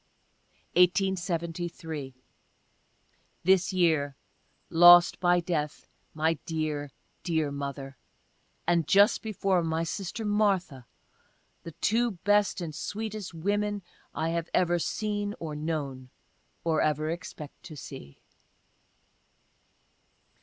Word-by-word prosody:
1873. 170 -5 0 0.7
— - - -41
This 185 +1 +4
year 160 -6 +2 0.6
lost, 175 +1 +8
by 175 0 +4
death, 155 -4 -3 0.3
my 160 0 +1
dear, 155 -3 -2 0.3
dear 160 -4 0
mother 140 -2 -6 0.3
— - - -41
and, 170 -3 +2
just 200 +2 +5
before, 195 -4 0
my 160 0 -1
sister 195 +5 -4
Martha 195 - 0 0.4
— - - -40
(the 165 - -8
two 230 +7 +1
best 205 -2 +3
and 165 -3 -5
sweetest 210 +2 -5
women 205 +3 -1 0.3
I 160 +1 -2
have 165 0 -2
ever 175 -1 +2
seen 205 +3 -2
or 155 -2 -5
known, 145 -5 -4 0.5
or 160 -2 +1
ever 155 +1 0
expect 165 -3 -8
to 155 - -9
see.) 130 - -10
170 Hz, 105 wpm, -28 LUFS, 155-190 Hz, 0.7 s, lost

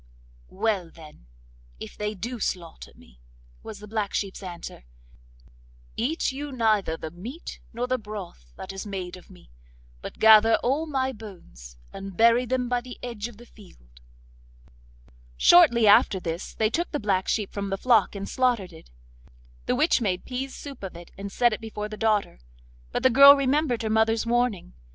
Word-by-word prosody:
'Well, 200 -4 -1
then, 155 - -16 0.5
if - - -9
they 210 0 -3
do 235 +5 -5
slaughter 175 -4 -5
me,' - - -20 0.4
was 215 - -9
the 210 +1 -11
black 210 -1 -3
sheep's 195 -1 -3
answer, 175 - -9 1.1
'eat 275 +8 -1
you 285 +2 -6
neither 215 -9 +1
the 160 - -7
meat 230 - -9
nor 240 +1 -3
the 255 0 -1
broth 195 - -9
that 195 - -8
is 195 - -6
made 190 -3 -6
of 180 - -16
me, 180 - -18 0.5
but - - -8
gather 220 +1 +7
all 285 +6 0
my 265 -3 -1
bones, 60 - -12 0.2
and 195 -2 -8
bury 235 +2 +5
them 250 0 -1
by 245 0 0
the 250 0 -10
edge 235 -3 -5
of 240 -4 -14
the 240 - -14
field.' - - -19 1.4
Shortly 290 -11 +6
after 200 -1 +5
this 170 0 -5
they 215 0 +1
took 345 +6 -1
the 295 - -3
black 195 -3 0
sheep 210 -3 -1
from 200 -1 -4
the 195 - -2
flock 225 -4 +3
and 200 0 -5
slaughtered 240 -9 0
it. 160 - -15 0.8
The - - +1
witch 310 -5 +2
made 185 -5 -1
pease 260 +1 -5
soup 280 -3 -9
of 190 -3 -7
it, 170 - -13
and 200 0 -7
set 240 +1 +2
it 215 - -5
before 210 -1 -6
the 215 - -7
daughter. 210 - 0 0.5
But - - -2
the 260 - +5
girl 280 +3 +9
remembered 275 -3 0
her 220 - -2
mother's 220 +1 +2
warning. 235 - -1
215 Hz, 175 wpm, -25 LUFS, 190-245 Hz, 1.4 s, girl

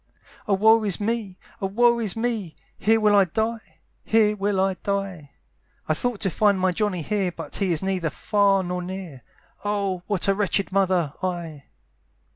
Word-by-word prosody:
"O 200 - +3
woe 220 +3 +5
is 200 -4 0
me! 210 -3 -2 0.2
O 195 - 0
woe 235 +4 +3
is 215 -5 -1
me! 225 -7 -2 0.2
"Here 225 +3 +3
will 210 -1 +4
I 200 -1 +6
die; 220 +5 -4 0.2
here 215 -1 +3
will 200 -1 0
I 190 0 +2
die; 195 -7 -3 0.6
"I 155 - +2
thought 235 +6 -2
to 195 -4 0
find 205 +1 +2
my 185 0 +2
Johnny 185 -3 -1
here, 195 0 -1
"But - - -6
he 195 -3 0
is 165 +2 0
neither 185 -4 -1
far 200 +3 +2
nor 180 0 -3
near, 180 -7 -7 0.4
"Oh! 200 -3 -1
what 200 -3 -1
a 195 - +4
wretched 200 -1 0
mother 185 -6 +1
I!" 170 -6 -4
195 Hz, 175 wpm, -24 LUFS, 180-210 Hz, 0.6 s, I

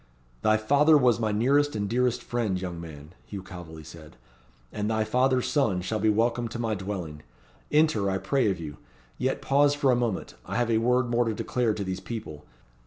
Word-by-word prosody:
"Thy 110 0 +3
father 145 +8 +4
was 125 -4 +3
my 110 -2 0
nearest 140 +7 +2
and 100 -1 -1
dearest 125 +2 0
friend, 110 -6 -1
young 90 -2 -5
man," 75 -1 -11
Hugh 100 -3 -7
Calveley 85 -4 -10
said; 80 -1 -13 0.5
"and 105 0 -2
thy 110 -1 +1
father's 125 +3 +1
son 115 -11 +1
shall 105 +4 -2
be 110 +1 +2
welcome 115 +2 +1
to 120 - -6
my 115 -2 -1
dwelling. 95 -7 -5 0.5
Enter, 150 -10 +3
I 95 - 0
pray 130 +2 +1
of 95 -3 -2
you. 75 -4 -7 0.4
Yet 135 +2 -1
pause 145 +1 +3
for 140 -2 +2
a - - +4
moment. 120 -5 -2
I 100 - -6
have 120 +1 +1
a 110 - +3
word 125 +1 +1
more 120 0 +2
to 110 -1 -1
declare 115 -1 0
to 100 - -3
these 95 -1 -4
people. 95 -8 -7
110 Hz, 200 wpm, -27 LUFS, 95-125 Hz, 0.5 s, father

